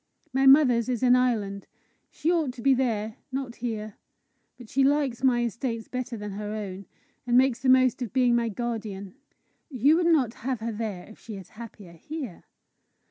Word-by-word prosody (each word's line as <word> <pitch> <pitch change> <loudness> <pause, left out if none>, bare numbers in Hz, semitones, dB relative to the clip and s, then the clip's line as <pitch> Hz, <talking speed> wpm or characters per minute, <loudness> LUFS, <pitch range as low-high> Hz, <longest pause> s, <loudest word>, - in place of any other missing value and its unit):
My 270 +1 +3
mother's 255 -4 +6
is 250 0 -1
in 250 0 +6
Ireland. 215 -6 0 0.4
She 330 - -1
ought 320 -7 0
to 240 -2 -10
be 275 - +5
there, 225 -4 -1
not 260 -2 -4
here; 220 -3 -5 0.6
but 245 -2 -12
she 270 +4 +1
likes 275 -3 +1
my 245 -2 +3
estates 230 0 -3
better 250 -2 -4
than 210 -1 -6
her 210 +1 -5
own, 195 -3 -6 0.4
and 240 0 +4
makes 255 -2 +3
the 260 0 0
most 255 0 +4
of 240 - -3
being 250 -2 +3
my 235 -1 +1
guardian." 215 -4 -5 0.6
"You 280 +3 +3
would 345 -1 +2
not 275 -9 +3
have 255 0 -2
her 230 +1 -3
there 210 -4 -4
if 220 - -15
she 220 - -9
is 190 -3 -10
happier 215 -5 -11
here?" 255 - -8
240 Hz, 185 wpm, -26 LUFS, 215-260 Hz, 0.6 s, mother's